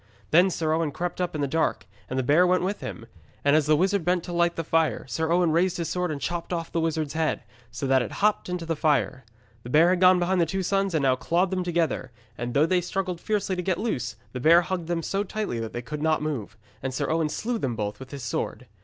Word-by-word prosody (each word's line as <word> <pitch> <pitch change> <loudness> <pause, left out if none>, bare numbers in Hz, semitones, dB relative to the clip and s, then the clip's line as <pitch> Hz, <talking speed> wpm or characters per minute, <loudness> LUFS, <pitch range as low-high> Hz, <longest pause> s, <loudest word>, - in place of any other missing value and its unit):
Then 175 +4 +6
Sir 160 -3 -1
Owen 160 -1 +1
crept 175 +5 -4
up 180 -3 -2
in 150 - -2
the 140 - +1
dark, 160 -5 0 0.2
and 130 - -3
the 130 - +1
bear 155 +8 +4
went 180 0 +2
with 200 +3 -2
him. 115 - -7 0.4
And 145 +1 +5
as 155 -2 +3
the 155 - +5
wizard 190 +3 +1
bent 175 0 +1
to 175 - -6
light 170 0 +2
the 165 - -2
fire, 165 0 +1
Sir 160 +4 -1
Owen 175 -1 +3
raised 175 +3 +2
his 170 -2 -2
sword 180 0 -1
and 150 -2 -3
chopped 175 +4 -3
off 165 -2 -3
the 170 - 0
wizard's 160 -3 -1
head, 160 -1 -1 0.3
so 125 +3 -5
that 135 -1 +4
it 120 - -4
hopped 210 -2 +1
into 180 -2 -3
the 165 0 -1
fire. 145 -4 +1 0.4
The 120 - -9
bear 160 +6 +5
had 185 0 +1
gone 185 0 +7
behind 180 +1 +1
the 165 - +2
two 190 +4 -2
sons 195 -1 0
and 150 - +1
now 130 -1 +4
clawed 175 +7 0
them 185 -1 -1
together, 165 -7 -1 0.2
and 120 +1 -5
though 145 +2 +5
they 180 +1 +2
struggled 180 -1 -3
fiercely 205 -3 -1
to 180 - -2
get 180 -1 0
loose, 155 - -2 0.2
the 130 - -5
bear 165 +6 +6
hugged 175 -2 -3
them 170 -1 -1
so 195 +4 -1
tightly 210 - -3
that 115 -1 -4
they 120 - -5
could 150 +4 -6
not 155 -1 +1
move. 140 -11 -4 0.2
And 130 0 -3
Sir - - -1
Owen 160 -1 +1
slew 230 +8 -2
them 125 - -2
both 105 -1 -3
with 130 0 -10
his 140 -2 -7
sword. 115 +1 -3
165 Hz, 260 wpm, -26 LUFS, 145-180 Hz, 0.4 s, gone